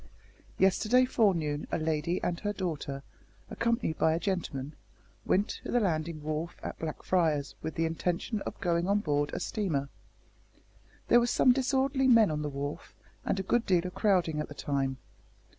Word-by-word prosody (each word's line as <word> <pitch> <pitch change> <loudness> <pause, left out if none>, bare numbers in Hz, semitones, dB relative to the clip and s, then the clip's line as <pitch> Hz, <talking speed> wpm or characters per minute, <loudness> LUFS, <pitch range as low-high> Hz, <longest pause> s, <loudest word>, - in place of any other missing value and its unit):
Yesterday 215 +7 +4
forenoon 170 - +1
a - - +1
lady 160 +2 -1
and 170 -1 -1
her 205 0 -2
daughter, 150 -7 -4 0.5
accompanied 230 -8 -1
by 160 0 +3
a - - -1
gentleman, 160 -8 -3 0.5
went 200 +3 +3 0.2
to - - -7
the 245 - +3
landing 160 -6 -1
wharf 155 +3 -3
at - - -6
Blackfriars 155 -2 0
with 160 - -5
the 165 - +1
intention 175 +6 -2
of - - -6
going 170 0 0
on 200 +1 +3
board 145 -4 0
a - - -3
steamer. 155 -10 -2 1.2
There 240 - +7
were 240 - +1
some 250 - +4
disorderly 265 +1 +1
men 230 -7 +6
on 150 0 -2
the 150 - -2
wharf, 140 +1 -6 0.3
and 195 - 0
a - - -1
good 240 +5 +1
deal 180 -2 +3
of 180 - -4
crowding 180 -7 +2
at 150 - -2
the 145 - -10
time. 135 -2 -1
170 Hz, 170 wpm, -30 LUFS, 150-205 Hz, 1.2 s, There